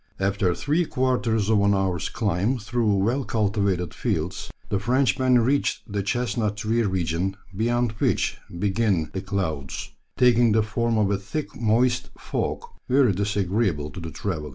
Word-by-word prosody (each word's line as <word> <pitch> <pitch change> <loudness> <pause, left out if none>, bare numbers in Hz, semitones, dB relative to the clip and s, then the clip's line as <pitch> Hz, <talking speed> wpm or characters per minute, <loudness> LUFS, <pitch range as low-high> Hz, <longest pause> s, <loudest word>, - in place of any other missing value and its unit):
After 95 -2 +1
three 150 +6 +1
quarters 125 -6 0
of 105 -2 +4
an 100 0 +3
hour's 95 -5 -1
climb 105 +2 0
through 110 -1 0
well 115 +8 +1
cultivated 100 -6 0
fields, - - -2 0.2
the 100 - 0
Frenchmen 130 +2 +3
reached 140 +5 +1
the 100 -3 -3
chestnut 105 0 -1
tree 110 +2 0
region, 95 -1 -1 0.2
beyond 120 +2 +1
which - - +1 0.2
begin 95 -3 +1
the 95 - -3
clouds, 80 -10 -3 0.3
taking 120 -2 +5
the 110 0 +3
form 115 +1 0
of 105 -2 +2
a 100 - 0
thick 100 +10 -5
moist 120 +3 +1
fog, - - -3 0.3
very 130 -4 +4
disagreeable 100 -5 0
to - - -8
the 85 -2 -6
traveller. 80 -4 -4
105 Hz, 150 wpm, -24 LUFS, 95-120 Hz, 0.3 s, taking